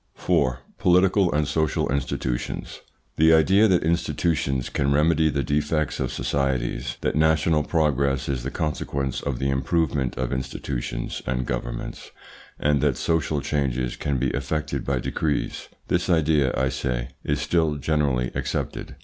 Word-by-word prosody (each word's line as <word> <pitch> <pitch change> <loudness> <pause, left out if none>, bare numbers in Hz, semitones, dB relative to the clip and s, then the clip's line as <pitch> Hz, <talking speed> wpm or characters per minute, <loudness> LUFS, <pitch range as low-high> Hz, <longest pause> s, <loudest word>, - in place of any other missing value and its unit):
4. 65 0 +1 0.2
POLITICAL 90 +1 +4
AND 75 -1 +1
SOCIAL 80 -1 0
INSTITUTIONS 65 -2 -3 0.4
The 80 +1 +6
idea 95 +7 +5
that 90 -4 +3
institutions 80 -5 0
can 70 0 0
remedy 80 +2 +3
the 70 -2 -1
defects 75 +3 0
of - - -1
societies, 65 -1 -1
that - - 0
national 80 0 +3
progress 70 -4 +1
is 65 -3 -1
the - - -3
consequence 70 -4 -2
of 70 -3 -2
the 70 +1 0
improvement 70 -1 0
of 65 -1 -2
institutions 65 -1 -4
and 65 0 -1
governments, - - -5 0.5
and 75 -2 +2
that - - +2
social 80 -3 0
changes 65 -4 -1
can 70 -2 -1
be - - 0
effected 70 0 -2
by 70 -1 +1
decrees 75 +4 -2 0.2
this 90 +1 0
idea, 75 -5 +3
I 65 0 +2
say, 65 -2 -2
is 75 0 0
still 75 +1 +1
generally 70 -4 0
accepted. - - -3
70 Hz, 140 wpm, -24 LUFS, 65-80 Hz, 0.5 s, The